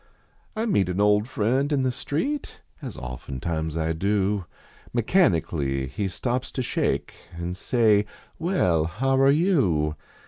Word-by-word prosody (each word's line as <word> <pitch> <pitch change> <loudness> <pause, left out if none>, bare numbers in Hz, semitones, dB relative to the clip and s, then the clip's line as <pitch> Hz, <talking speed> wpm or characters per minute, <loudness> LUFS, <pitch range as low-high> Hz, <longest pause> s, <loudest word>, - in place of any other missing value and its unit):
I 220 +1 -1
meet 100 - +2
an 90 +2 -2
old 105 +1 +3
friend 130 +5 0
in 140 -2 +2
the 130 - +1
street, 260 - -3 0.2
As - - -7
oftentimes 75 +6 -4
I 80 0 0
do, 100 +2 0 0.5
Mechanically 85 - +1
he 95 +10 -3
stops 120 +8 -2
to 130 - -2
shake - - -1 0.2
An 85 +1 -3
say: 105 +1 +2
" - - -29
Well, 90 - +2
how 130 +11 0
are 135 - +6
you 135 - +2
105 Hz, 140 wpm, -25 LUFS, 80-135 Hz, 0.5 s, are